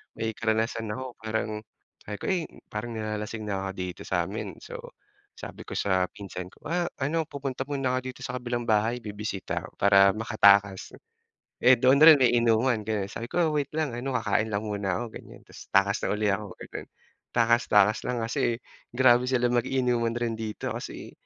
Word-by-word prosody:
may 110 0 -2
karanasan 110 0 -1
ako 130 -1 -6
parang 110 -1 -2 0.4
sabi 105 - -6
ko - - -5
eh, 175 -3 0 0.3
"Parang 115 +2 -4
nilalasing 110 0 -4
na 95 -1 -2
ako - - -3
dito 90 -1 -5
sa'min." - - -2
So - - -8 0.6
sabi - - -9
ko - - -6
sa 95 -2 +2
pinsan 95 -3 -7
ko, - - -23
"Ah, 175 0 0
ano 160 +4 0
pupunta 135 -2 -4
muna 135 -3 -1
ako - - +1
dito - - -18
sa 125 0 -3
kabilang 120 -1 -3
bahay 110 +3 +2
bibisita," 105 -2 -4
para 100 0 +6
makatakas, 100 -3 +3 0.7
eh 130 0 +7
doon 130 +4 +4
rin 155 -1 +10
may 125 - +5
inuman 115 0 +2
kaya 105 -3 -1
sabi 115 - -5
ko, 165 -3 +1
"Wait 145 -2 0
lang 155 -6 0
ano, 130 +1 -3
kakain 110 0 0
lang 100 +2 -1
muna 100 -3 -2
ako," - - -3
ganiyan, - - -14
tas - - -13
takas 100 +1 +3
na - - -1
uli 105 -1 +1
ako 100 -1 -4
gano'n, - - -8 0.5
takas 115 0 +4
takas 105 +1 +5
lang 120 -2 -1
kasi 115 0 0 0.4
grabe 125 -1 +5
sila 125 -2 +2
mag-inuman 120 -1 +1
rin 120 -1 -1
dito. 110 -2 -4
Kasi - - -7
115 Hz, 180 wpm, -27 LUFS, 105-125 Hz, 0.7 s, rin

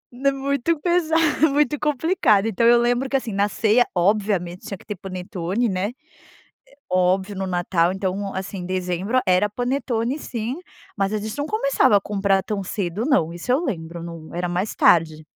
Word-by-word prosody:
Né, 275 +2 +2
muito 280 +3 -1
pesado 325 -2 +2
muito 295 0 +1
complicado. 295 - +2
Então 225 +2 +2
eu 240 0 +6
lembro 245 +2 +1
que, 275 - +2
assim, 230 -5 -5
na 200 +1 +1
ceia, 220 +4 +3
obviamente, 185 -2 0
tinha 195 - -5
que - - -19
ter 210 - -5
panetone, 185 +4 -3
né. 185 -1 -1
É 315 +6 -18 0.8
óbvio 185 +2 +1
no 190 0 -3
Natal. 175 -1 +1
Então, 195 +1 -3
assim, 190 -1 -5
dezembro 185 +5 -1
era 185 +3 +3
panetone 245 +2 -2
sim, 240 0 -4 0.4
mas 195 0 0
a - - +1
gente 215 +3 -5
não 290 - -1
começava 440 - +3
a - - +3
comprar 195 -2 +1
tão 200 0 -3
cedo 195 +4 -3
não, 170 - +2
isso 175 +7 -6
eu 275 +7 +2
lembro 165 - -4
no 165 -2 -9
era 175 +1 -2
mais 180 +4 -2
tarde. 160 -2 +3
205 Hz, 175 wpm, -22 LUFS, 185-255 Hz, 0.8 s, eu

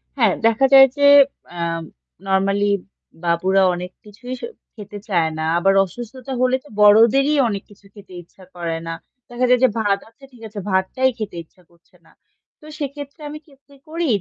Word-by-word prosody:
হ্যাঁ 225 -8 +2
দেখা 230 +4 +3
যায় 270 0 +9
যে, 285 0 +4 0.4
অ্যাম 170 -1 -4 0.4
নরমালি 195 +1 +1 0.5
বাবুরা 185 +3 +2
অনেক 180 +1 -6
কিছুই 240 +5 -9
স - - -14 0.3
খেতে 210 -1 -10
চায় 170 -6 0
না। 155 - -2
আবার 195 +3 +3
অসুস্থতা 240 +7 -10
হলে 255 0 +2
তো 295 - -18
বড়দেরই 230 +8 +5
অনেক 200 -3 -4
কিছু 205 0 -20
খেতে 200 -3 -15
ইচ্ছা 185 +3 -21
করে 170 -2 -4
না। 165 - -3 0.4
দেখা 240 +1 -1
যায় 250 0 +4
যে 260 - +6
ভাত, 200 -2 +1
আচ্ছা 250 +5 -18
ঠিক 240 - -17
আছে, 210 -1 -8
ভাতটাই 190 +8 +1
খেতে 210 -4 -6
ইচ্ছা 180 +3 -28
করছে 170 0 -30
না। - - -23 0.5
তো - - -18
সেক্ষেত্রে 285 +1 -7
আমি 305 +1 -8
কি 305 - -23 0.2
কি 280 - -19
করি 335 +1 -2
210 Hz, 175 wpm, -20 LUFS, 190-260 Hz, 0.5 s, যায়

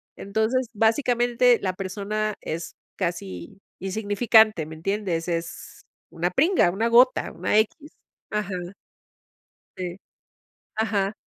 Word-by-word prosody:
Entonces, 220 +5 -1
básicamente 240 +1 +3
la 185 -2 -1
persona 205 +3 -3
es 165 +1 -5 0.2
casi 170 - -5 0.2
insignificante. 210 -1 +3
¿Me 155 - -9
entiendes? 180 -1 -2
Es 165 -1 -5 0.3
una 175 +2 -2
pringa, 295 - +3
una 225 +5 0
gota, 245 +2 +4
una 210 - 0
equis. 290 +8 0 0.4
Ajá. 210 -2 -2 1.2
Sí. 180 0 -5 0.8
Ajá. 210 -2 0
205 Hz, 100 wpm, -24 LUFS, 180-225 Hz, 1.2 s, gota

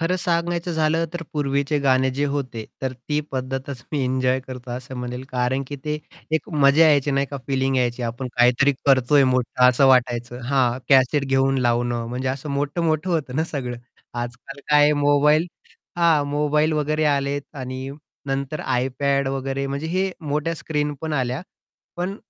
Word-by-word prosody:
खरं 170 +3 +1
सांगायचं 170 0 -1
झालं 160 +1 +1
तर 175 - -3
पूर्वीचे 140 0 0
गाणे 130 -1 +2
जे 145 - +2
होते 125 -6 -4 0.2
तर 130 - -1
ती 150 +4 -3
पद्धतच 130 0 -4
मी 145 -3 0
एन्जॉय 130 0 +1
करतो 125 -1 -9
असं 125 +2 -6
म्हणेल, 125 +1 -5
कारणकी 130 +3 -1
ते 150 0 -2 0.3
एक 160 - 0
मजा 145 +1 +5
यायची 145 -1 +3
नाही 140 0 +1
का? 140 - -6
फीलिंग 135 -1 0
यायची. 125 -1 0
आपण 120 +2 -4
काहीतरी 125 +3 +4
करतोय 135 +1 +5
मोठं 125 0 +3
असं 130 +2 +4
वाटायचं 125 -1 +2
हां, 130 -2 +2
कॅसेट 135 +1 +4
घेऊन 135 0 +2
लावणं. 120 -1 0
म्हणजे 125 +2 -3
असं 135 +3 -4
मोठं-मोठं 155 +4 -1
होतं 145 -6 -1
ना 160 - +2
सगळं 130 -6 -4 0.5
आजकाल 120 +3 -8
काय 150 0 +6
आहे 150 +1 +5
मोबाईल 145 +3 +4 0.5
हां, 165 -4 +4
...मोबाईल 150 +2 +1
वगैरे 155 +1 0
आलेत 140 -1 +1
आणि 130 0 -5 0.4
नंतर 140 +2 -2
आयपॅड 135 +2 0
वगैरे, 135 0 -2
म्हणजे 140 +3 -3
हे 185 +3 0
मोठ्या 150 +1 -1
स्क्रीनपण 150 -1 -3
आल्या 130 -2 -1 0.6
पण 180 +3 -3
140 Hz, 160 wpm, -22 LUFS, 130-150 Hz, 0.6 s, काय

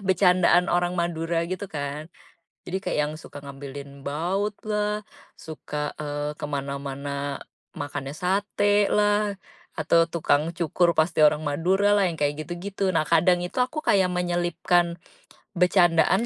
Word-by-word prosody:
bercandaan 180 -1 +4
orang 175 0 +1
Madura 165 -1 -1
gitu 185 +2 -4
kan, 145 -1 -5 0.6
jadi 180 - -3
kayak 180 - -1
yang 150 - -4
suka 145 -2 -10
ngambilin 140 0 -9
bautlah, 210 +6 -2 0.3
suka, 150 -2 -5
eee, 145 0 -3
kemana-mana, 140 0 -4 0.4
makannya 145 -2 -5
satelah, 205 +2 +2 0.4
atau 165 +1 +3
tukang 165 -1 +1
cukur 170 +1 +2
pasti 160 0 +2
orang 150 0 +4
Maduralah 195 +7 +2
yang 170 - -4
kayak 145 +1 0
gitu 175 - -6
gitu, 200 +1 -4
nah 155 - +2
kadang 175 +2 +4
itu 180 - -7
aku 255 +5 0
kayak 190 -2 +3
menyelipkan, 175 0 +1 0.6
becandaan 180 +2 +3
170 Hz, 120 wpm, -25 LUFS, 150-190 Hz, 0.6 s, bercandaan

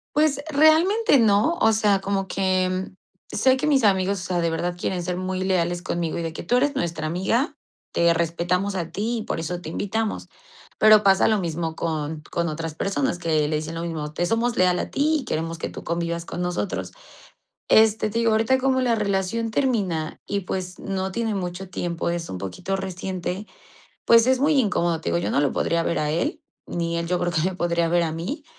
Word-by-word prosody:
Pues, 300 -2 +3
realmente 315 +6 +4
no, 225 +8 +3
o 225 0 +4
sea, 210 -2 +3
como 195 0 -2
que 185 -1 0 0.4
sé 260 +4 +3
que 265 - -2
mis 275 -5 +3
amigos, 195 -1 +2
o - - -6
sea, 180 -2 -1
de 170 -1 0
verdad 175 +2 -2
quieren 180 0 -2
ser 180 +1 -3
muy 185 0 -2
leales 175 -2 0
conmigo 170 -2 -2
y - - -2
de 165 -1 -4
que: - - -7
"Tú 245 +8 +2
eres 285 +3 +1
nuestra 165 -6 -2
amiga, 190 - 0 0.3
te 170 0 +3
respetamos 175 +4 -1
a 170 -3 -3
ti 230 +4 -2
y 220 - -4
por - - -3
eso 175 +2 -3
te 170 - -8
invitamos". 210 +5 -3 0.5
Pero 215 -1 +7
pasa 195 -2 +4
lo 215 -2 +2
mismo 165 -2 -3
con 155 -2 -3
con 170 0 -1
otras 160 0 -4
personas 200 - -1
que 155 -3 +1
le 155 - -1
dicen 155 +2 -3
lo 165 - -4
mismo: 155 -3 -4
"Te 175 +2 -1
somos 235 +1 0
leal 180 -1 +3
a - - -4
ti 310 +3 +2
y - - -11
queremos 165 +1 -3
que - - -4
tú - - -9
convivas 170 0 -2
con 180 - -4
nosotros". 180 +2 -3 0.8
Este, 220 -1 +4
te 230 - -1
digo, 230 -1 +2
ahorita 225 +4 +3
como 260 0 +1
la 245 -3 +2
relación 210 +2 -1
termina 200 - -1
y, 200 0 -1
pues, 185 0 -5
no 190 -1 -3
tiene 225 0 -1
mucho 180 0 -5
tiempo, 170 -2 -3
es 170 -1 -3
un 95 - -5
poquito 100 - -4
reciente, 190 +1 -4 0.6
pues, 230 +1 +6
es 260 - +4
muy 290 +4 +3
incómodo, 170 -7 0
te - - -4
digo, - - +1
yo - - -2
no - - +3
lo 145 -2 +2
podría 170 0 0
ver 170 - -1
a 150 0 0
él, 300 - -1 0.3
ni 170 -1 -2
él 170 - -3
yo 180 0 +1
creo 175 0 -1
que 165 - +1
me 185 0 -1
podría 170 -1 +1
ver 170 0 +2
a 160 - -2
mí. 175 - -5
185 Hz, 215 wpm, -24 LUFS, 170-220 Hz, 0.8 s, Pero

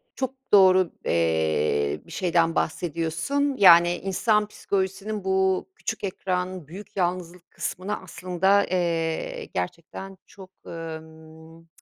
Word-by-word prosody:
Çok 265 0 -3 0.2
doğru, 185 -3 +6
eee, 80 -3 +1
bir 170 - -13
şeyden 170 -2 +1
bahsediyorsun. 170 - -1
Yani, 175 -2 +7
insan 210 +3 +1
psikolojisinin 195 +1 -3
bu 190 - +1
küçük 220 - -5
ekran 185 -3 -3
büyük 200 +4 -11
yalnızlık 180 -1 -3
kısmına 195 +3 -4
aslında, 185 +3 +1
eee, 165 -3 -1
gerçekten 170 - -5
çok, 190 -2 -14 0.2
ımm, 160 0 -10
180 Hz, 100 wpm, -25 LUFS, 165-195 Hz, 0.2 s, Yani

